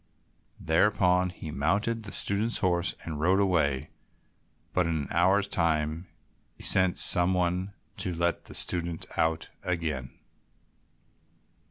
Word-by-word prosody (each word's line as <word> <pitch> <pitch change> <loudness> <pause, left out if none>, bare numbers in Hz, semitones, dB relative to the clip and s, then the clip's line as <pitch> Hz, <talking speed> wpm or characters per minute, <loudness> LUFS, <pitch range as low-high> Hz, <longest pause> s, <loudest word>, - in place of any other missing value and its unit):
Thereupon 90 +1 +2
he 80 -3 -8
mounted 105 +10 -1
the 100 - -7
student's 105 +4 0
horse 90 -3 0
and 80 -3 -5
rode 90 +5 +2
away, 80 -9 +1 0.8
but 90 -2 +1
in 80 -1 -1
an - - -7
hour's 95 +4 +3
time 80 -1 -1 0.5
sent 95 -2 +4
some 90 +1 +4
one 90 +2 -1 0.2
to 90 - -3
let 85 0 -1
the - - -10
student 85 -2 -2
out 80 0 -1
again. 80 -8 -3
90 Hz, 120 wpm, -28 LUFS, 80-95 Hz, 0.8 s, sent